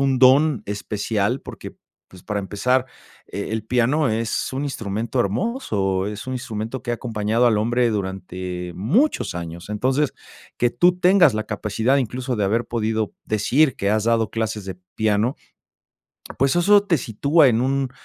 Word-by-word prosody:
un 135 -2 +2
don 135 +1 +5
especial 105 +3 -2
porque - - -9 0.4
pues, 90 -1 -14
para 105 -1 -3
empezar, 125 +6 0 0.4
eh, 100 - -5
el 110 -1 -2
piano 125 +5 +2
es 110 0 -1
un 135 - -2
instrumento 115 -2 -2
hermoso, 100 - -1
es 105 +2 -6
un 130 - -4
instrumento 120 -1 -5
que 120 - -4
ha - - +1
acompañado 115 0 0
al 110 -3 +3
hombre 120 +2 +1
durante 95 -3 -4
muchos 190 - +1
años, 85 +1 -7
entonces, 130 +7 0 0.4
que 120 - +2
tú 180 +6 +3
tengas 180 - +5
la 110 0 -2
capacidad, 110 +5 0
incluso 125 +1 -2
de 105 - 0
haber 115 +5 +1
podido 110 -2 -2
decir 125 +7 +2
que 100 - 0
has 110 0 +1
dado 115 -2 +1
clases 110 -2 -3
de 95 -2 -7 0.2
piano 110 +4 +1 1.0
pues 135 +5 +2
eso 200 +4 +5
te 175 -7 +1
sitúa 140 +7 +3
en 115 0 +2
un 135 0 0
115 Hz, 160 wpm, -22 LUFS, 105-130 Hz, 1.0 s, don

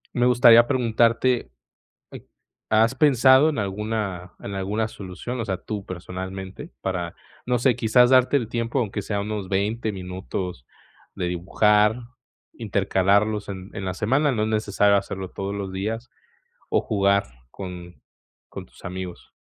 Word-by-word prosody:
me 120 - +2
gustaría 120 -1 +7
preguntarte, 120 - +1 1.2
¿has 110 +4 +3
pensado 135 +1 +5
en 155 - -3
alguna 100 -3 -3
en 100 - -6
alguna 105 +3 -1
solución, 105 +6 -7
o - - -3
sea, 95 -3 -2
tú 100 +2 -6
personalmente? 95 - -7
Para, 90 -3 -3 0.3
no 125 -1 +1
sé, 125 -1 +3
quizás 120 +2 +4
darte 130 +2 +5
el 115 -5 -2
tiempo, 115 +2 -1
aunque 105 -3 -2
sea 100 +1 -2
unos 105 -2 -4
20 105 +3 -1
minutos 90 -5 -5 0.5
de 90 - -2
dibujar, 105 +5 +2 0.6
intercalarlos 100 0 +1
en 95 0 -7
en 100 - -5
la 95 - -2
semana, 135 +9 +2
no 105 -3 0
es 110 - 0
necesario 105 -1 +2
hacerlo 95 -1 -4
todos 100 +1 -4
los 100 -2 -4
días, 110 +5 -4 0.6
o - - +3
jugar 100 -1 +2 0.3
con 90 0 -9 0.5
con - - -8
tus - - -20
amigos. 90 -1 -7
105 Hz, 140 wpm, -24 LUFS, 95-115 Hz, 1.2 s, gustaría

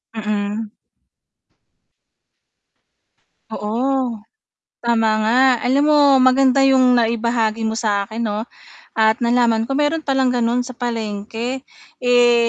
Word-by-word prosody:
Mm. 210 0 -3 2.8
Oo, 235 +2 -2 0.6
tama 225 -2 +1
nga 225 +4 +1 0.2
alam 270 +4 +1
mo 300 -1 +4 0.2
maganda 260 +1 +3
yung 255 -2 +4
naibahagi 230 -1 -1
mo 220 0 -2
sa 205 -3 0
akin 220 +3 -9
'no 210 +1 -3 0.5
at 220 +1 +2
nalaman 235 -2 +1
ko 270 - -3
meron 295 +2 -1
palang 265 -2 +1
gano'n 245 0 0
sa 255 - -9
palengke. 230 +2 -5 0.3
Eh, 240 -1 +3
235 Hz, 105 wpm, -19 LUFS, 220-255 Hz, 2.8 s, mo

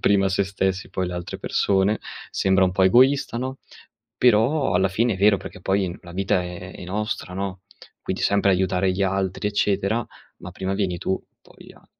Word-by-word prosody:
prima 100 -1 +3
sé 95 +1 +1
stessi 95 0 -2
poi, 95 -1 -2
le 90 - -5
altre 90 -1 -6
persone, 100 +2 +1 0.3
sembra 95 0 +3
un 90 - 0
pò 95 0 +3
egoista, 130 +4 +4
no, 130 +2 -4 0.6
però, 125 - +3
alla 95 +2 +3
fine, 115 +4 +1
è - - -6
vero, 100 +1 +4
perché 90 - -10
poi 95 -2 0
la 85 - -12
vita 95 0 0
è 90 +1 -8
è - - -9
nostra, 100 0 -3
no, 95 -1 -4 0.4
quindi - - -3
sempre 100 0 +3
aiutare 95 0 +1
gli 95 +2 0
altri 95 +1 -1
eccetera, 105 +2 0 0.3
ma - - -9
prima 95 +1 -3
vieni 95 -3 -1
tu 95 - -2 0.2
poi - - -16
a - - -22
95 Hz, 185 wpm, -23 LUFS, 95-105 Hz, 0.6 s, egoista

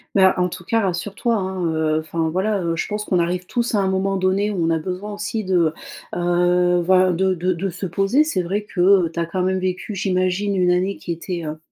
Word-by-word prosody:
Mais 190 - +6
en 180 0 +1
tout 175 - -8
cas, 225 +6 +1
rassure-toi, 195 +5 -1
hein, 190 -3 -2
heu, 155 0 +1
enfin, 160 +1 -2
voilà, 190 +4 0
heu, 165 -1 -1
je - - -2
pense 210 0 -3
qu'on 180 - +1
arrive 180 +1 -1
tous 235 +3 -1
à - - +3
un 195 - +1
moment 195 +1 0
donné 190 +2 +1
où 180 -5 -1
on 165 - +1
a 160 - +1
besoin 185 +5 -5
aussi 210 +1 -3
de, 175 -4 +2 0.4
heu, 175 0 +2
voilà, 185 +1 +4
de 190 +2 +1
de 180 +2 0
de 195 +3 -3
se 180 +2 -5
poser. 195 - +2
C'est 305 -12 -1
vrai 195 +4 -2
que 190 -2 +3
tu 170 - -6
as 170 - 0
quand 180 +2 -2
même 190 0 +1
vécu, 185 +3 -3
j'imagine, 190 +1 0
une 180 -1 +3
année 185 +2 0
qui 175 - -6
était, 170 0 -4
heu, 155 0 -5
185 Hz, 235 wpm, -21 LUFS, 175-195 Hz, 0.4 s, Mais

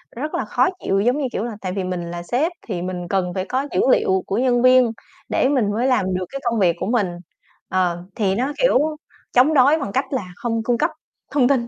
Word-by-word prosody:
rất 300 +6 -4
là - - -1
khó - - +2 0.2
chịu, 195 0 +2
giống 245 +7 +2
như 280 - -1
kiểu 210 - -2
là, 240 - -3
tại 185 -1 -3
vì 195 0 -2
mình 180 -2 -4
là 175 0 -5
sếp 280 - 0 0.2
thì 180 -5 -3
mình 180 -1 -4
cần 180 -2 -1
phải 185 0 -2
có 265 +5 -2
dữ - - 0
liệu 190 -5 +2
của 200 - -1
nhân 245 -1 +2
viên 255 -1 +5 0.4
để - - +2
mình 235 -8 +1
mới 240 +5 0
làm 190 -8 +1
được 185 0 -2
cái 275 - -6
công 230 -2 0
việc 175 -3 +3
của - - -2
mình. 225 -5 +1 0.6
Ờ, 175 -2 0
thì 195 -3 +1
nó, 265 +6 -1
kiểu, - - +4 0.5
chống 260 +6 +5
đối 285 +3 +5
bằng 200 - -4
cách 265 +6 0
là 210 -8 -2
không 230 -2 -2
cung 240 0 +1
cấp - - +1 0.4
thông 265 -4 +3
tin, 245 -3 +1
230 Hz, 240 wpm, -21 LUFS, 185-255 Hz, 0.6 s, viên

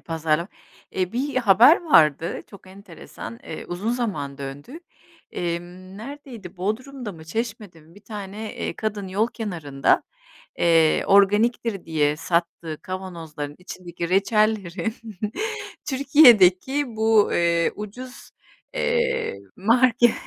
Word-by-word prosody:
pazara 165 +2 -1 0.4
Eee, 185 +1 -2
bir 270 +3 -2
haber 245 - +6
vardı 160 - +3
çok 200 -2 -14
enteresan, 185 - -10
eee, 160 - -7
uzun 195 +6 -3
zaman 155 - -3
döndü. 145 - -8 0.5
Emm, 175 +2 -5
neredeydi? 235 -6 -9
Bodrum'da 225 +4 -4
mı 160 -1 -13
Çeşme'de 210 -2 -5
mi 160 +3 -20
bir 205 - -18
tane, 210 +1 -7
eee, - - -3
kadın 205 -3 -3
yol 205 +4 +1
kenarında, 165 - 0 0.6
eee, 165 -2 +4
organiktir 205 +1 +3
diye 150 -2 +1
sattığı 170 -2 -2
kavanozların 165 -6 -6
içindeki 175 -2 -7
reçellerin 205 0 +1 0.9
Türkiye'deki 265 - +5
bu, 220 -1 +3
eee, 170 -1 +2
ucuz, 245 +5 -9 0.4
eee, 485 - 0 0.2
marke 240 +3 +4
195 Hz, 105 wpm, -23 LUFS, 170-230 Hz, 0.9 s, haber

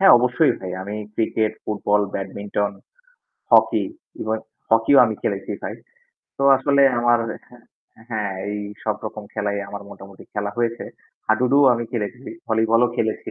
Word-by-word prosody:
হ্যাঁ 195 - +8
অবশ্যই 125 +6 +3
ভাই। 95 -1 -5
আমি 100 +2 -5 0.2
ক্রিকেট, 110 -1 0
ফুটবল, 105 0 +1
ব্যাডমিন্টন, 100 +1 -2 0.8
হকি - - +5 0.4
এবং 110 0 0 0.3
হকিও 115 +5 +5
আমি 110 - -2
খেলেছি 100 -1 -2
ভাই। - - -4 0.6
তো 140 - -3
আসলে 140 +1 +3 0.2
আমার 120 0 +4 0.9
হ্যাঁ 105 -3 -2 0.2
এই 105 - -3 0.2
সবরকম 110 0 -4
খেলাই 100 -1 -1
আমার 100 0 -7
মোটামুটি 100 -1 -12
খেলা 105 -1 -2
হয়েছে। 115 0 -1 0.4
হাডুডুও 125 +6 +4
আমি 120 - -3
খেলেছি, 120 +3 -4 0.2
ভলিবলও 110 +2 +3
খেলেছি। 110 -2 -2
110 Hz, 130 wpm, -22 LUFS, 105-120 Hz, 0.9 s, হ্যাঁ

